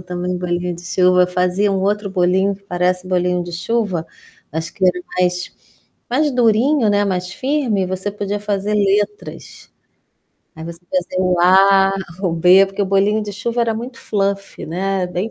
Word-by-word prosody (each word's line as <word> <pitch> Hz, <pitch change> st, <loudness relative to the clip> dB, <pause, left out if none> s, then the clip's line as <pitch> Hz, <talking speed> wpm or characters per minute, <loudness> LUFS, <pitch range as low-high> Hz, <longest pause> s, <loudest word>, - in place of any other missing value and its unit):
também 180 Hz, 0 st, -4 dB
bolinho 175 Hz, 0 st, -2 dB
de 175 Hz, -, -11 dB
chuva. 180 Hz, +1 st, +3 dB
Eu -, -, +3 dB
fazia 180 Hz, +3 st, 0 dB
um 195 Hz, -1 st, 0 dB
outro 205 Hz, +1 st, 0 dB
bolinho 190 Hz, +1 st, +1 dB
que 200 Hz, -, -25 dB
parece 180 Hz, -1 st, -1 dB
bolinho 180 Hz, -1 st, 0 dB
de 175 Hz, -, -8 dB
chuva, 180 Hz, -1 st, -2 dB, 0.4 s
acho 160 Hz, +2 st, -4 dB
que 190 Hz, -, -2 dB
era 180 Hz, 0 st, +2 dB, 0.2 s
mais 180 Hz, 0 st, 0 dB, 0.5 s
mais 295 Hz, +5 st, +1 dB
durinho, 245 Hz, +1 st, +2 dB
né, 205 Hz, 0 st, +2 dB
mais 180 Hz, -1 st, -2 dB
firme 255 Hz, -7 st, -1 dB
você 185 Hz, +2 st, -3 dB
podia 205 Hz, 0 st, -3 dB
fazer 205 Hz, 0 st, -2 dB
letras. 205 Hz, 0 st, -2 dB, 0.9 s
Aí 160 Hz, -, -8 dB
você 170 Hz, 0 st, -8 dB
fazia 185 Hz, 0 st, -1 dB
o 180 Hz, -1 st, +1 dB
A, 195 Hz, +2 st, +5 dB, 0.3 s
o 180 Hz, -4 st, 0 dB
B 180 Hz, +4 st, +5 dB
porque 195 Hz, +1 st, -3 dB
o -, -, -1 dB
bolinho 200 Hz, +3 st, +2 dB
de 205 Hz, -1 st, -6 dB
chuva 230 Hz, +4 st, -2 dB
era 230 Hz, -1 st, +1 dB
muito 240 Hz, +2 st, -7 dB
fluffy, 200 Hz, -1 st, -3 dB
né, 190 Hz, +3 st, -2 dB
é -, -, 0 dB
bem 180 Hz, +5 st, -3 dB
190 Hz, 175 wpm, -18 LUFS, 180-205 Hz, 0.9 s, A